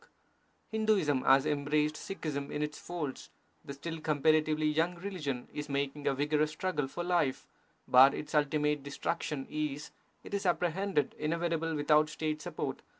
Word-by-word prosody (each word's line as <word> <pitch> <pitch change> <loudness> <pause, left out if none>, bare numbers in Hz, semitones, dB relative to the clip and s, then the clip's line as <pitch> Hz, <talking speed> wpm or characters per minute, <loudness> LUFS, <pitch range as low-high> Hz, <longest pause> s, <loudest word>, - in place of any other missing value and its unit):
Hinduism 210 -12 +2
has 135 +1 +6
embraced 150 +1 +1
Sikhism 150 -6 -4
in 150 - -2
its 150 0 -4
folds; 155 -7 -5 0.3
the 140 - -7
still 160 +3 -6
comparatively 155 0 +2
young 160 +4 +1
religion 170 -9 -4
is 150 0 -5
making 140 +1 -2
a 135 - +2
vigorous 150 +2 +1
struggle 155 -3 -2
for 175 +6 -5
life, 175 -7 +1 0.4
but 130 +2 +7
its - - -6
ultimate 150 0 +2
destruc 140 +4 -3
tion 140 -3 -3
is, 150 0 -3 0.3
it - - -10
is 200 -1 0
apprehended, 175 -1 +1
inevitable 165 0 -1
without 150 +1 +3
State 155 0 -3
support. - - -4
150 Hz, 150 wpm, -31 LUFS, 145-165 Hz, 0.4 s, but